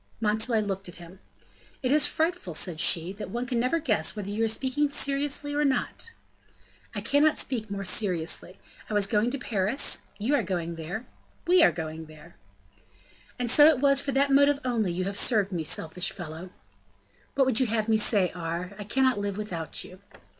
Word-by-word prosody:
Montalais 220 +1 +1
looked 195 -2 -4
at 175 - -7
him. 175 +2 -12 0.6
"It 255 - 0
is 300 0 +5
frightful," 320 - -2
said 160 0 -1
she, 170 +2 +4
"that 205 - -8
one 240 +2 -3
can 245 -1 -1
never 255 +7 +1
guess 215 - 0
whether 200 -1 -5
you 220 +2 -1
are - - +2
speaking 265 +6 0
seriously 285 +1 -1
or 295 +1 +1
not." 275 - -2 0.9
"I - - -3
cannot 295 +2 +2
speak 220 -5 -2
more 200 -1 -5
seriously. 180 -2 -1 0.3
I 215 - -3
was 205 -1 +4
going 210 +3 +1
to 280 - -3
Paris, 220 +1 +1 0.2
you 220 +8 -1
are 285 - +3
going 175 -4 -3
there, 170 +9 -6 0.4
we 360 +1 +5
are - - +6
going 160 -1 -6
there." 155 0 -15 1.0
"And 245 -2 -1
so 295 +3 +8
it 315 -3 +4
was 275 0 +3
for 280 - -3
that 275 +1 +2
motive 280 +1 +4
only 225 -7 0
you 180 +2 -2
have 200 +2 -1
served 210 -5 +2
me; 170 -3 -2
selfish 160 +4 -2
fellow!" 175 0 -8 0.9
"What 270 - +3
would 255 -4 +1
you 260 - +2
have 220 -1 -1
me 220 -1 +3
say, 205 -4 +3
Aure? 175 +2 -5
I 205 - -6
cannot 260 +1 +1
live 200 -1 -3
without 175 -7 -4
you." 185 - -13
215 Hz, 190 wpm, -27 LUFS, 180-265 Hz, 1.0 s, so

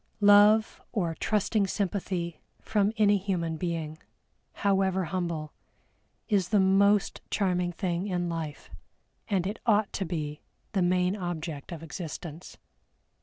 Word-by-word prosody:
Love 205 +2 +6
or 175 -7 -1
trusting 205 +3 +1
sympathy 185 -4 -2 0.2
from 210 -1 +1
any 205 -2 +4
human 175 -4 -2
being, 160 -2 -3 0.7
however 190 -1 +2
humble, 170 -4 -3 0.7
is 195 -5 +1
the 210 - +4
most 195 +1 +3
charming 180 -3 0
thing 175 +1 -2
in 175 -2 -1
life, 165 -3 -5 0.6
and 190 -4 0
it 205 +4 -3
ought 210 -2 +3
to 195 - -1
be 155 -4 -4 0.3
the 195 - +1
main 180 +1 +2
object 165 -6 -5
of 165 -2 -7
existence. 165 0 -7
185 Hz, 120 wpm, -28 LUFS, 170-200 Hz, 0.7 s, Love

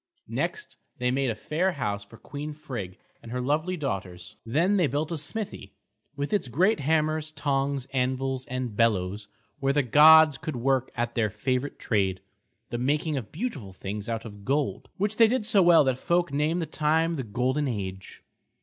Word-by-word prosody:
Next 425 -1 -3 0.2
they 125 -1 0
made 135 0 +1
a 115 - -1
fair 175 - -1
house 105 -8 -3
for 110 +3 -15
Queen 150 +4 -7
Frigg 120 -12 -7 0.2
and 115 - -10
her 125 - -2
lovely 155 +8 0
daughters. 95 - -5
Then 165 - +2
they 175 -5 +3
built 150 +4 -2
a - - -1
smithy, 150 - -4 0.4
with 145 +7 -3
its 200 -10 +1
great 180 - +2
hammers, 155 +1 +1
tongs, 140 -3 -1
anvils, 130 0 -1
and 130 -3 -4
bellows, 100 -2 +1 0.3
where 135 +1 +1
the 145 0 +2
gods 155 +3 +7
could 155 - -4
work 130 +1 +1
at 120 -1 -2
their 110 -3 +1
favourite 130 +6 -2
trade, 95 -4 0 0.5
the 120 - -2
making 150 +4 0
of 125 -6 -5
beautiful 150 - -5
things 100 +3 -6
out 115 0 -3
of 100 -2 -10
gold; 140 +4 -1
which 205 +2 0
they 230 - +7
did 230 -1 0
so 210 -3 +4
well 170 -3 +7
that 130 -2 0
folk 175 0 +1
name 150 +4 +1
that 160 -2 -5
time 160 +2 +1
the 140 - -2
Golden 130 +6 0
Age. 95 -5 -5
135 Hz, 180 wpm, -27 LUFS, 115-155 Hz, 0.5 s, gods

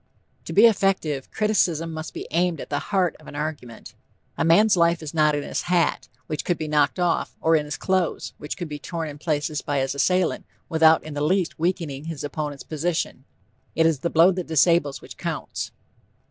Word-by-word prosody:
To - - -6
be 210 - +7
effective, 190 - +1
criticism 175 -7 +1
must 160 0 -7
be - - -5
aimed 175 +1 +1
at - - -8
the - - 0
heart 185 -4 +1
of 155 - -17
an - - -9
argument. 145 -6 -6 0.4
A - - 0
man's 195 +6 +5
life 170 -1 +2
is 150 - -6
not 150 -2 +3
in 145 - -2
his - - -3
hat, 175 -1 +1 0.2
which 155 -2 -4
could 175 - 0
be 155 - -4
knocked 150 +1 +2
off, 175 -2 0
or 160 0 +3
in 150 -1 +1
his 150 - -5
clothes 185 -3 -1
which 150 - -6
could 175 -3 -4
be 150 -1 -6
torn 165 +1 -4
in 145 0 -10
places 150 -1 -1
by 145 - -2
his 135 -1 0
assailant 180 +4 +1 0.2
without 160 -1 +5
in 155 - -7
the 145 - -3
least 175 +2 0
weakening 160 -5 -2
his 160 -4 -5
opponent's 145 -1 -4
position. 155 -4 -3 0.5
It 160 - +3
is 160 -4 +2
the 170 - -1
blow 170 +3 +5
that 180 -1 -4
disables 160 -2 +2
which - - -11
counts. - - -4
160 Hz, 200 wpm, -24 LUFS, 150-175 Hz, 0.5 s, be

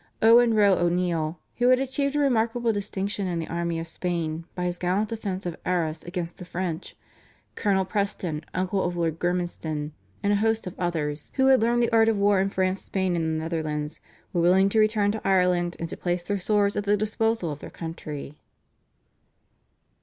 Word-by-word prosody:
Owen 230 +1 +6
Roe 205 -2 +5
O'Neill, 175 -2 0 0.2
who 245 - +3
had 255 - +6
achieved 275 +2 -1
a - - +2
remarkable 235 -3 +2
distinction 200 -1 -2
in 175 -2 -2
the 165 - -3
army 170 0 -2
of 165 0 -4
Spain 165 -2 -3
by 180 - -2
his 175 0 -2
gallant 190 +4 0
defence 200 -4 -4
of 175 -2 -3
Arras 165 -3 -1
against 175 -1 -5
the - - -7
French, 180 -1 -4 0.6
Colonel 195 -3 +1
Preston, 185 -6 -2
uncle 185 +1 0
of 175 0 -2
Lord 165 -1 -1
Gormanston, 175 -4 -2 0.3
and 205 0 +3
a - - +3
host 225 +1 +1
of 180 - -5
others, 155 -4 -2
who 265 - +3
had 265 -3 +6
learned 240 +1 +3
the 235 - +1
art 225 0 +5
of 220 - +1
war 200 -1 +3
in 195 +1 +1
France, 190 0 -1
Spain, 190 -2 -1
and 165 -1 0
the 160 0 -1
Netherlands, 155 -2 -3 0.3
were 175 - +2
willing 190 +3 +5
to 220 - +2
return 215 -1 +3
to 220 - -4
Ireland 180 -2 +2
and 170 - -3
to - - -7
place 175 0 -1
their 200 +2 -2
swords 205 +1 +2
at 205 - -2
the 205 0 +3
disposal 215 -3 0
of 145 - -6
their - - -9
country. 150 -3 -7
185 Hz, 190 wpm, -26 LUFS, 170-210 Hz, 0.6 s, Owen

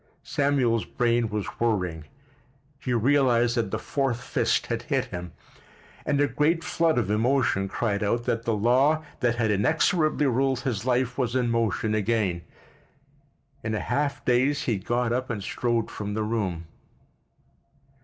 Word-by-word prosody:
Samuel's 135 -6 +1
brain 120 -1 0
was 105 -1 -2
whirring. 90 -9 -1 0.7
He 125 - -4
realized 120 -1 +3
that 115 -4 0
the - - -2
fourth 135 -4 -1
fist - - 0
had - - -3
hit - - -1
him, 90 -1 -7 0.8
and 145 -1 +1
a 145 - +4
great 160 +4 +1
flood 165 -3 +1
of 110 -4 0
emotion 110 -3 +1
cried 100 0 -1
out 115 +3 0
that 115 -1 -1
the 115 -1 -1
law 130 +9 +3 0.2
that 120 -3 +1
had 115 -2 +1
inexorably 155 - +2
ruled 130 0 +1
his 120 -6 -3
life 125 0 0
was 125 -1 0
in 125 -2 +1
motion 110 -2 0
again. 105 -5 0 1.2
In 110 -1 -2
a - - -1
half 140 - -2
daze 130 +3 +2
he 110 -5 0
got 120 +4 0
up 130 +1 -2
and 105 -4 -3
strode 120 +2 -1
from 105 -1 -5
the 110 - -1
room. 100 -7 -2
120 Hz, 155 wpm, -26 LUFS, 105-135 Hz, 1.2 s, a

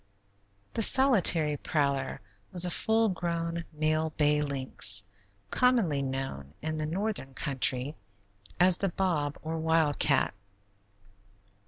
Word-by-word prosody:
The - - -1
solitary 185 - +4
prowler 140 -4 -2 0.3
was 180 0 +6
a 180 - -3
full 225 +5 +1
grown, 170 -2 -3
male 155 +1 -1
bay 150 -1 +1
lynx, 130 -8 +1 0.5
commonly 230 - +1
known 130 - -5
in 155 0 -4
the 155 0 -3
northern 180 -6 -4
country 130 0 0 0.7
as 180 0 +4
the 195 - -1
bob, 165 -6 -2
or 160 +1 -4
wildcat. 160 -3 +1
155 Hz, 110 wpm, -28 LUFS, 140-175 Hz, 0.7 s, was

